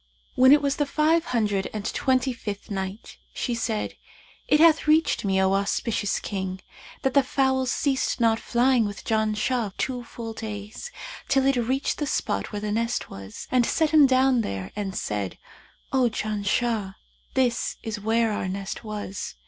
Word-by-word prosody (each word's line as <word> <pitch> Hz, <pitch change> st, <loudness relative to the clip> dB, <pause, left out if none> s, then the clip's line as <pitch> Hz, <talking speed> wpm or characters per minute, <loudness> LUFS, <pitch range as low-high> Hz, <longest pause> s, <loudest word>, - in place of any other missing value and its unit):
When 260 Hz, +1 st, +6 dB
it 295 Hz, 0 st, +6 dB
was 280 Hz, -1 st, +1 dB
the 290 Hz, -, +1 dB
Five 315 Hz, +3 st, +2 dB
Hundred 210 Hz, -5 st, 0 dB
and 210 Hz, -1 st, -4 dB
Twenty 260 Hz, -1 st, +1 dB
fifth 205 Hz, -2 st, -6 dB
Night, 190 Hz, +2 st, -5 dB, 0.2 s
She 245 Hz, -, -1 dB
said, 225 Hz, -2 st, -2 dB, 0.5 s
It 300 Hz, -, +4 dB
hath 320 Hz, -1 st, +5 dB
reached 310 Hz, +1 st, +3 dB
me, 190 Hz, -1 st, +1 dB
O 190 Hz, 0 st, +3 dB
auspicious 205 Hz, +1 st, 0 dB
King, 190 Hz, -2 st, -4 dB, 0.4 s
that 265 Hz, -, +1 dB
"the 280 Hz, -, +6 dB
fowl 265 Hz, 0 st, +1 dB
ceased 265 Hz, +1 st, 0 dB
not 225 Hz, -1 st, +3 dB
flying 245 Hz, -1 st, +2 dB
with 205 Hz, -1 st, -6 dB
Janshah 220 Hz, 0 st, 0 dB
two 250 Hz, -2 st, -2 dB
full 230 Hz, -1 st, -7 dB
days; 215 Hz, -, -7 dB, 0.4 s
till 270 Hz, -1 st, +3 dB
it 275 Hz, 0 st, +3 dB
reached 255 Hz, +3 st, 0 dB
the 295 Hz, -, -1 dB
spot 215 Hz, -5 st, -1 dB
where 205 Hz, -, -4 dB
the 210 Hz, 0 st, -2 dB
nest 230 Hz, +2 st, -1 dB
was, 95 Hz, +1 st, -9 dB
and 255 Hz, -1 st, +4 dB
set 315 Hz, +5 st, +1 dB
him 300 Hz, -3 st, +7 dB
down 260 Hz, -1 st, +3 dB
there 95 Hz, -, -4 dB
and 195 Hz, -2 st, -3 dB
said, 105 Hz, -3 st, -3 dB, 0.6 s
'O 255 Hz, -2 st, +4 dB
Janshah, 215 Hz, -1 st, -1 dB, 0.4 s
this 245 Hz, -3 st, +1 dB
is 220 Hz, -2 st, -4 dB
where 225 Hz, +2 st, +1 dB
our 205 Hz, -, -2 dB
nest 195 Hz, +3 st, -5 dB
was.' 210 Hz, -3 st, -5 dB
230 Hz, 165 wpm, -25 LUFS, 205-265 Hz, 0.6 s, him